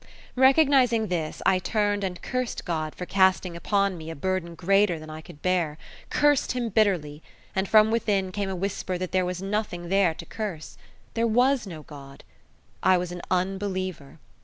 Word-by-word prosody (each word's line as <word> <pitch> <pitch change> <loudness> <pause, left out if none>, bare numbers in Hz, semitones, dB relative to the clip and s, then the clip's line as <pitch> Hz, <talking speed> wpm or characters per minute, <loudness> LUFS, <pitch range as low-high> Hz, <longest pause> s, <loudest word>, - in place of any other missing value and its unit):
Recognizing 260 -4 +4
this, 165 -4 -3
I 185 - +4
turned 205 +1 0
and 180 -2 -3
cursed 255 -1 -3
God 155 -3 -3
for 180 - -5
casting 190 -2 +2
upon 195 +1 0
me 160 0 -8
a 165 - -6
burden 170 +1 -2
greater 195 +1 +2
than 155 0 -9
I 155 0 -7
could 160 -2 -15
bear 175 -5 0 0.3
cursed 290 -3 +2
Him 245 -2 -2
bitterly, 180 -9 +1 0.3
and 190 +1 0
from 215 0 +6
within 200 -5 0
came 200 0 -2
a 190 - -3
whisper 185 0 -3
that 185 0 -4
there 185 0 +2
was 180 +1 -4
nothing 195 -4 -3
there 190 -4 +3
to - - -9
curse. 195 -8 -6 0.4
There 230 0 +1
was 245 +1 +2
no 160 -5 -8
God. 140 -2 -12 0.6
I 185 -1 +5
was 180 0 -3
an 175 0 -6
unbeliever. 185 -4 -2
185 Hz, 175 wpm, -26 LUFS, 170-210 Hz, 0.6 s, from